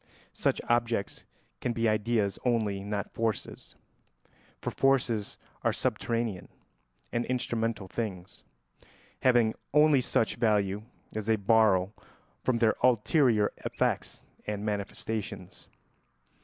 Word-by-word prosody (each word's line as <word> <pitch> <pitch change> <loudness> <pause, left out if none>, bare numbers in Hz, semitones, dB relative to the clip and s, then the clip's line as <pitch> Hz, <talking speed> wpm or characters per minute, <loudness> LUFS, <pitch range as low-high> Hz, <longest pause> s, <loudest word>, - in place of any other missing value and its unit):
Such - - 0
objects 120 -3 0 0.3
can 120 - -1
be 115 -1 +1
ideas 110 -2 +1
only, 110 -5 0
not 100 0 -3
forces, 115 -2 -3 0.8
for - - -3
forces 125 -6 +1 0.2
are - - +2
subterranean 115 -6 -2 0.6
and 120 - +1
instrumental 115 -5 -1
things, 95 -3 -5 0.8
having 120 -3 +4 0.2
only 150 -3 +6
such 115 - +1
value 105 -3 +1 0.3
as 110 -1 -3
they 110 - +4
borrow 100 -2 +3 0.5
from 130 -2 +2
their 115 -2 +4
ulterior 120 -2 +3
effects - - -2 0.2
and 105 0 -3
manifestations. 105 +1 -4
110 Hz, 100 wpm, -29 LUFS, 105-120 Hz, 0.8 s, only